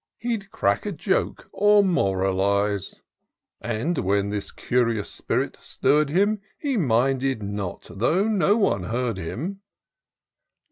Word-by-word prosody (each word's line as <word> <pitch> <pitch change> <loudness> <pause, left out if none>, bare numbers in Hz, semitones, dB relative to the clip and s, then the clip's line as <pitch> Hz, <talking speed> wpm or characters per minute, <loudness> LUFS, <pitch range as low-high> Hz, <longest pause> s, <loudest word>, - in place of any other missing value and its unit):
He'd 225 -4 -3
crack 220 0 0
a - - -1
joke, 190 +2 -1
or 205 0 +5
moralize: 100 - 0 0.6
And 120 +9 -1
when 100 +1 +1
this 105 -1 -3
curious 115 -4 0
spirit - - -2
stirr'd 150 0 +1
him, 200 +6 +2 0.2
He 280 -3 -1
minded 135 - +1
not 100 -2 -4
though 160 - +1
no 205 -1 +3
one 100 - +1
heard 115 -1 -2
him. 165 - -5
125 Hz, 120 wpm, -24 LUFS, -, 0.6 s, or